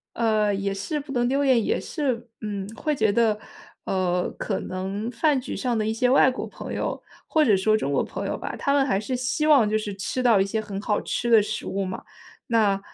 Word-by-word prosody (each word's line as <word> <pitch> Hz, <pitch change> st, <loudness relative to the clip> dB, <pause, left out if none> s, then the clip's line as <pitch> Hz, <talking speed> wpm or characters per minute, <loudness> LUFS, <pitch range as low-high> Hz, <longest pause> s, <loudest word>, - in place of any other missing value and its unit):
呃， 215 Hz, -3 st, +2 dB
也 195 Hz, 0 st, -1 dB
是 295 Hz, -, -3 dB
不 280 Hz, -1 st, -9 dB
能 245 Hz, -2 st, +1 dB
丢 275 Hz, +3 st, +1 dB
脸， 255 Hz, -4 st, +4 dB
也 -, -, +1 dB
是 255 Hz, -7 st, -3 dB
嗯， 200 Hz, -3 st, -4 dB
会 305 Hz, -2 st, -1 dB
觉 220 Hz, -5 st, +2 dB
得， 220 Hz, -1 st, +2 dB, 0.5 s
呃， 180 Hz, -1 st, 0 dB
可 195 Hz, -, -2 dB
能 195 Hz, +4 st, -4 dB
饭 280 Hz, +4 st, +2 dB
局 250 Hz, -, -5 dB
上 250 Hz, -3 st, -1 dB
的 215 Hz, -1 st, 0 dB
一 -, -, +1 dB
些 250 Hz, +3 st, +1 dB
外 260 Hz, 0 st, +6 dB
国 255 Hz, -, -4 dB
朋 -, -, -8 dB
友， -, -, -3 dB, 0.3 s
或 310 Hz, -1 st, +3 dB
者 210 Hz, -7 st, +4 dB
说 215 Hz, +3 st, +3 dB
中 140 Hz, -10 st, -1 dB
国 140 Hz, -, +2 dB
朋 -, -, -5 dB
友 -, -, -2 dB
吧， -, -, -5 dB
他 280 Hz, -, 0 dB
们 280 Hz, -1 st, +3 dB
还 195 Hz, -7 st, +1 dB
是 255 Hz, +5 st, -3 dB
希 255 Hz, +5 st, 0 dB
望 275 Hz, -8 st, +6 dB
就 215 Hz, -, 0 dB
是 210 Hz, -2 st, -4 dB
吃 195 Hz, +6 st, -3 dB
到 235 Hz, -5 st, +5 dB
一 195 Hz, -, +3 dB
些 220 Hz, +2 st, -2 dB
很 200 Hz, -2 st, -6 dB
好 210 Hz, 0 st, 0 dB
吃 240 Hz, -, -2 dB
的 225 Hz, -, +8 dB
食 205 Hz, -, -4 dB
物 195 Hz, 0 st, -2 dB
嘛。 185 Hz, 0 st, -5 dB, 0.4 s
那， 210 Hz, -4 st, +2 dB
220 Hz, 250 characters per minute, -25 LUFS, 200-255 Hz, 0.5 s, 的